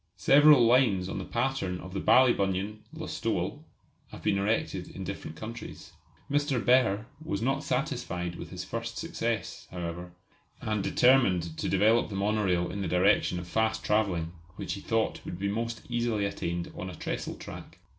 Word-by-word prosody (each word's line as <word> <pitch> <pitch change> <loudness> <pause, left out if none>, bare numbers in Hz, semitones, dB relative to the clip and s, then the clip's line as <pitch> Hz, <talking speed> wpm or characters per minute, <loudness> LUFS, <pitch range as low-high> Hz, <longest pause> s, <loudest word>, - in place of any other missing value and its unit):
Several 145 -3 +7
lines 115 -7 +4
on 95 - -4
the 95 - -5
pattern 120 -7 -1
of 95 0 -9
the 100 - -2
Ballybunion 105 -5 +3
Listowel - - -3 0.4
have - - -11
been 100 -2 +2
erected 105 +3 -1
in - - -7
different 80 - -6
countries. 115 +1 -8 0.4
Mr. 145 -2 +1
Behr 115 -4 +3 0.2
was 100 -10 -2
not 135 +5 0
satisfied 90 0 -2
with 85 - -8
his 90 0 -6
first 115 +4 -5
success, 120 -9 -3
however, 90 0 -5 0.5
and 110 -2 -1
determined 95 -13 +3
to - - -2
develop 110 +5 +3
the 100 - -6
monorail 100 -3 +1
in 100 - -4
the 95 - -1
direction 90 +1 +3
of 90 0 -6
fast 110 +4 0
travelling, 95 -6 +1 0.2
which - - -4
he - - -6
thought - - -1
would 85 - -6
be 100 +2 -2
most 115 +2 -3
easily 120 -4 0
attained 85 -3 -3
on 95 - -5
a 90 - -8
trestle - - -4
track. - - -10
105 Hz, 165 wpm, -29 LUFS, 90-115 Hz, 0.5 s, Several